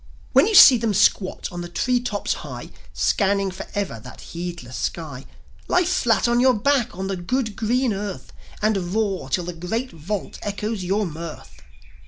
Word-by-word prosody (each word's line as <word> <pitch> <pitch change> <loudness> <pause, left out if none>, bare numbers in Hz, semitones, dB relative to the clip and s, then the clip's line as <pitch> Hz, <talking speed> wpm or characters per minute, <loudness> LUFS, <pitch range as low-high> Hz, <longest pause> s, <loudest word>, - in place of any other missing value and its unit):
When - - +6
you 435 - +1
see 260 -8 +10
them 220 -3 0
squat 185 0 +2
on 175 0 -5
the 175 - -6
tree 245 +7 +1
tops 210 -4 -2
high, - - -8 0.2
Scanning 195 -1 +1
for 185 - -8
ever 195 - -2
that - - -12
heedless 170 -8 -6
sky, 145 -5 -4 0.4
Lie 360 0 +3
flat 240 - +2
on 240 0 +2
your 255 0 +5
back 245 -2 +1
on 190 - -3
the 195 0 -2
good, 220 +5 -2
green 240 +2 +1
earth 200 0 -6 0.3
And 195 -3 0
roar 200 -10 -1
till 175 +6 0
the 175 +1 -5
great 220 +10 -3
vault 180 +5 -5
echoes 205 0 -3
your 200 +4 0
mirth." 155 - -8
200 Hz, 175 wpm, -23 LUFS, 175-230 Hz, 0.4 s, see